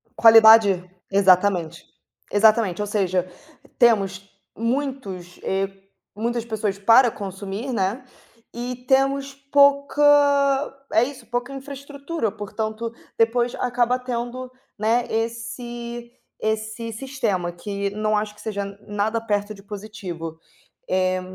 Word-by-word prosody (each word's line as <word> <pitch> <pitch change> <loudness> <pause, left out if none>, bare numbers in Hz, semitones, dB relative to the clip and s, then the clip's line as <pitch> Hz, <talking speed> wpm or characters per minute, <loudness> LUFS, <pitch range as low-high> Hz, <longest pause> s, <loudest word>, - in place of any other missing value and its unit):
Qualidade. 220 -4 +7 0.3
Exatamente. 185 -3 +3 0.4
Exatamente 210 -2 +3
ou 205 - -2
seja, 185 -3 0 0.5
temos 195 -5 +2 0.3
muitos, 230 -8 -3
eh, 195 0 -1 0.5
muitas 235 +2 -2
pessoas 215 -3 -2
para 230 +5 +6
consumir, 200 +4 -6
né, 215 +3 -1 0.5
e 245 +1 -5
temos 275 +1 +2
pouca, 280 +1 +3 0.9
é 225 - +4
isso, 275 -3 -9
pouca 245 +3 -3
infraestrutura, 280 0 -5
portanto, 220 +2 -4 0.3
depois 235 +1 +2
acaba 245 0 +1
tendo, 250 +1 -5 0.3
né, 230 +3 +1
esse, 235 +1 -4 0.3
esse 220 +1 -2
sistema 225 -7 -2
que 200 +2 -4
não 215 +1 0
acho 210 0 -2
que - - -15
seja 200 -2 -3 0.2
nada 210 +2 -1
perto 205 -1 -1
de 195 -1 -15
positivo, 195 -6 -7 0.5
eh. 185 0 +1
220 Hz, 105 wpm, -23 LUFS, 200-245 Hz, 0.9 s, Qualidade